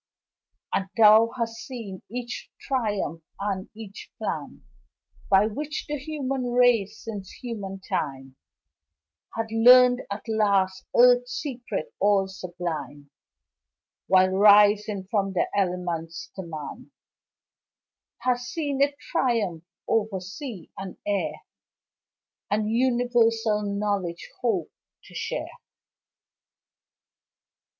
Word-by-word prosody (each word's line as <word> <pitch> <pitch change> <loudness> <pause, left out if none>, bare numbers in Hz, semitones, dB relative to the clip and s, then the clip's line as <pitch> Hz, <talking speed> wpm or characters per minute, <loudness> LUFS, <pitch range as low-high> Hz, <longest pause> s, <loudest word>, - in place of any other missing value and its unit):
And 190 0 0
thou 220 +1 +7
hast 230 -1 -2
seen 220 -5 -7
each 240 +2 -6
triumph 205 - -2 0.2
and 200 -1 -3
each 215 -3 -10
plan - - -5 0.7
By 195 +1 +5
which 295 +8 -4
the 295 0 -2
human 270 -3 -3
race 235 -4 +3
since 205 -4 -6
human 200 -6 -6
time 135 -2 -3 1.0
Hath 225 -1 -3
learned 250 +2 +7
at 200 +1 -5
last 200 -4 +1
Earth's 245 0 +5
secrets 245 -7 -4
all 200 -1 +3
sublime 175 -6 -6 1.0
While 185 0 +5
rising 205 0 +5
from 195 -3 +1
the 185 - +1
elements 175 -4 -2
to 190 - -5
man 155 -3 -8 1.3
Hast 245 0 0
seen 285 -5 -2
it 285 0 +3
triumph 210 - -1 0.2
over 220 -3 +1
sea 200 - -8
and 190 -1 -7
air 205 -1 0 1.2
And 215 +1 0
universal 235 -3 +2
knowledge 200 -4 -2
hope 205 -9 0 0.3
to - - -16
share. - - -4
210 Hz, 100 wpm, -26 LUFS, 190-245 Hz, 1.3 s, thou